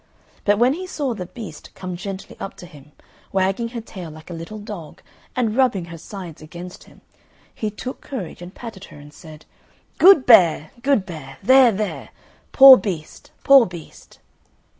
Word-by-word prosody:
But 205 Hz, 0 st, +3 dB
when 245 Hz, +4 st, +3 dB
he 370 Hz, +4 st, -6 dB
saw 285 Hz, -8 st, -3 dB
the 180 Hz, -5 st, -7 dB
beast 190 Hz, -8 st, -11 dB
come 185 Hz, -1 st, -6 dB
gently 195 Hz, +2 st, -8 dB
up 195 Hz, -, -7 dB
to -, -, -11 dB
him, 150 Hz, -4 st, -16 dB, 0.4 s
wagging 195 Hz, +4 st, 0 dB
her 230 Hz, 0 st, -7 dB
tail 185 Hz, -6 st, -9 dB
like 155 Hz, +3 st, -12 dB
a -, -, -5 dB
little 165 Hz, +6 st, -8 dB
dog 205 Hz, -7 st, -10 dB, 0.3 s
and 230 Hz, -4 st, 0 dB
rubbing 240 Hz, -9 st, +1 dB
her -, -, -8 dB
sides 180 Hz, -4 st, -10 dB
against 175 Hz, +3 st, -11 dB
him, -, -, -20 dB, 0.5 s
he 215 Hz, -, -3 dB
took 250 Hz, +5 st, -8 dB
courage, 195 Hz, -, -7 dB
and 175 Hz, +2 st, -10 dB
patted 220 Hz, -5 st, -9 dB
her, -, -, -15 dB
and 145 Hz, 0 st, -14 dB
said, 155 Hz, -2 st, -14 dB, 0.5 s
"Good 365 Hz, -6 st, +7 dB
bear, 170 Hz, -9 st, +5 dB
good 265 Hz, -6 st, +1 dB
bear! 150 Hz, -7 st, -10 dB
there, 260 Hz, +2 st, +6 dB
there! 210 Hz, 0 st, -4 dB, 0.4 s
poor 270 Hz, -1 st, +10 dB
beast, 170 Hz, -9 st, -6 dB
poor 275 Hz, -4 st, +7 dB
beast!" 175 Hz, -3 st, -13 dB
195 Hz, 170 wpm, -21 LUFS, 170-235 Hz, 0.5 s, poor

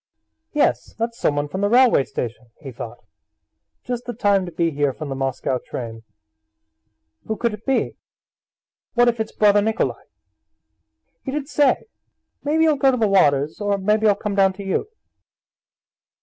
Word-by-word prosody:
"Yes, 300 Hz, -, 0 dB
that's 230 Hz, +1 st, -3 dB
someone 145 Hz, 0 st, 0 dB
from 190 Hz, +7 st, -4 dB
the 205 Hz, -, +2 dB
railway 240 Hz, -, +5 dB
station," 120 Hz, +1 st, -5 dB
he 140 Hz, -4 st, -8 dB
thought, 115 Hz, 0 st, -8 dB, 0.9 s
"just 245 Hz, -1 st, -4 dB
the 245 Hz, -, -4 dB
time 200 Hz, -4 st, +2 dB
to -, -, -6 dB
be 165 Hz, 0 st, 0 dB
here 145 Hz, -2 st, 0 dB
from 150 Hz, +2 st, -7 dB
the 135 Hz, -, -3 dB
Moscow 135 Hz, -1 st, -1 dB
train... 115 Hz, -3 st, -7 dB, 1.3 s
Who 220 Hz, -, -2 dB
could 235 Hz, -2 st, 0 dB
it 210 Hz, +4 st, -10 dB
be? 270 Hz, -, 0 dB, 1.0 s
What 240 Hz, 0 st, +5 dB
if 235 Hz, -1 st, -2 dB
it's 220 Hz, 0 st, -2 dB
brother 205 Hz, -1 st, +4 dB
Nikolay? 220 Hz, +1 st, -1 dB, 1.2 s
He -, -, -5 dB
did 280 Hz, 0 st, -3 dB
say: 285 Hz, -3 st, +2 dB, 0.6 s
'Maybe 320 Hz, +2 st, +2 dB
I'll 305 Hz, -2 st, +3 dB
go 270 Hz, -, +4 dB
to 255 Hz, -, +1 dB
the 225 Hz, -2 st, +2 dB
waters, 150 Hz, -5 st, +2 dB
or 205 Hz, -1 st, +1 dB
maybe 210 Hz, +3 st, +2 dB
I'll 205 Hz, -, +5 dB
come 205 Hz, 0 st, -4 dB
down 195 Hz, -1 st, +3 dB
to 200 Hz, +1 st, -9 dB
you. 195 Hz, -, -1 dB
205 Hz, 165 wpm, -22 LUFS, 145-240 Hz, 1.3 s, railway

